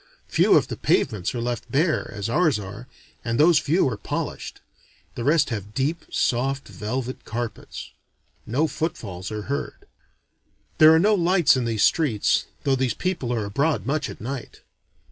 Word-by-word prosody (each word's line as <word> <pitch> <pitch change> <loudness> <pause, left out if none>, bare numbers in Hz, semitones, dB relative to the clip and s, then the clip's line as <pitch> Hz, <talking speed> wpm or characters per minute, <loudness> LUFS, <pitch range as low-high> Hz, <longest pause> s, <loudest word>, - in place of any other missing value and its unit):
Few - - +3
of - - +1
the - - -5
pavements 105 +2 0
are 120 - -2
left 120 0 -4
bare, 155 +3 +1
as 105 -1 -4
ours 150 +1 +2
are, 105 +4 -8 0.4
and 115 -1 -1
those 160 0 +6
few 160 +2 +2
are 120 -5 -2
polished: - - -5 0.5
the 120 - -5
rest 150 +1 +3
have 105 -1 -5
deep 150 +5 -1
soft 135 +3 0
velvet 125 +4 -4
carpets. 115 -1 -6 0.6
No 130 +8 +1
footfalls 115 - -4
are 105 -1 -4
heard. 140 - -4 0.9
There 155 -1 +9
are 160 - +6
no 205 +6 +4
lights 175 -5 +4
in 130 -2 -1
these 115 -2 0
streets, 140 -11 +2 0.2
though 135 - +2
these 130 -2 0
people 175 -10 -2
are 115 -4 -1
abroad 140 +10 0
much 150 +3 -1
at - - -9
night. 130 +2 -6
130 Hz, 165 wpm, -24 LUFS, 115-155 Hz, 0.9 s, There